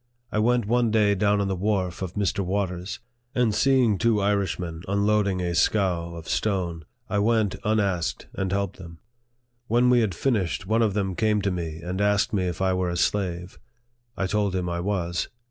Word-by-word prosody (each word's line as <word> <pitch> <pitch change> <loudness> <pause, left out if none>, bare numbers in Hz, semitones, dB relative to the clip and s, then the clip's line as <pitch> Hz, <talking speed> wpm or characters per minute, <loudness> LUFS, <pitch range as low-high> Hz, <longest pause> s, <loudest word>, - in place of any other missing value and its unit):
I 110 - 0
went 120 +1 +2
one 120 +2 +2
day 105 -2 +3
down 100 +1 +2
on 100 - 0
the 95 - -1
wharf 95 -2 -1
of 95 -2 -4
Mr. 100 -2 0
Waters; 95 -1 -2 0.4
and 120 -4 +2
seeing 125 -5 +3
two 115 -3 +3
Irishmen 95 -5 -1
unloading 100 -1 +1
a 90 -1 -1
scow 85 -2 +1
of 80 -1 -9
stone, 90 -6 -1 0.2
I 100 - 0
went, 110 -2 +2
unasked, 100 -6 0
and 95 -1 -2
helped 100 -1 -1
them. 85 -3 -11 0.7
When 120 +2 +3
we 125 - +5
had 105 -6 0
finished, 100 -7 0
one 110 +4 +2
of 105 -3 +1
them 95 -3 0
came 105 +3 +1
to 100 - +1
me 80 -3 -4
and 90 +3 -3
asked 105 +3 +2
me 95 -3 +1
if 90 +1 -3
I 95 -1 +2
were 90 -1 0
a 85 - -2
slave. 90 -1 -1 0.6
I 100 - 0
told 100 -1 0
him 90 -1 -1
I 85 0 -2
was. 90 -2 -1
100 Hz, 190 wpm, -25 LUFS, 90-105 Hz, 0.7 s, we